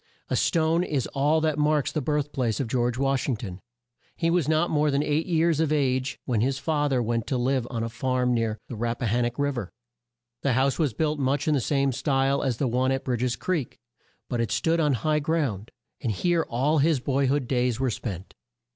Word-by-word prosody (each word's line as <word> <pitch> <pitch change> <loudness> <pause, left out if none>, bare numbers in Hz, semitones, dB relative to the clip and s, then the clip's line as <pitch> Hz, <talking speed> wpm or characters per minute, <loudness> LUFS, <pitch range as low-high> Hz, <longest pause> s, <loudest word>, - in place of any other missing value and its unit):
A - - 0
stone 165 +1 +2
is 145 -7 -1
all 150 +3 +2
that 155 -1 0
marks 150 -1 +2
the 155 - -1
birth 150 +1 -1
place 120 -6 -1
of 135 - -1
George 120 0 0
Wash 135 0 0
ing 130 - +1
ton. 95 -4 -7 0.5
He 165 0 0
was 170 -4 +1
not 160 +2 +2
more 150 0 +2
than 140 +1 +1
eight 150 +2 0
years 165 -2 +2
of 160 -2 +1
age 130 -3 0
when 120 -5 0
his 130 +2 +1
fa 150 -1 0
ther 130 -3 +1
went 115 0 -1
to 130 - 0
live 125 0 0
on 115 -3 -3
a - - -1
farm 125 +1 0
near 115 -2 0
the 120 - -6
Rap 115 +2 -2
pa - - -3
han 120 +2 +1
nock 120 +1 -3
Riv 140 -3 0
er. 100 -5 -7 0.7
The 140 - +1
house 135 +4 +1
was 145 -9 +1
built 155 -2 0
much 135 +1 0
in 155 - +3
the 140 - +1
same 140 +2 +1
style 135 +1 +1
as 130 -4 -1
the 135 - 0
one 130 +2 +1
at 135 0 -2
Bridg 125 -3 -1
es 125 -1 0
Creek, 165 -9 -2 0.5
but 120 -1 -1
it 115 - -1
stood 165 +1 +1
on 150 -3 +3
high 150 +6 +1
ground, 145 - -1 0.3
and 120 - -1
here 170 - +1
all 140 +6 +1
his 155 0 +3
boy 135 +2 0
hood 135 -1 0
days 125 -2 0
were 130 -2 +1
spent. 100 -4 -6
135 Hz, 230 wpm, -26 LUFS, 120-150 Hz, 0.7 s, in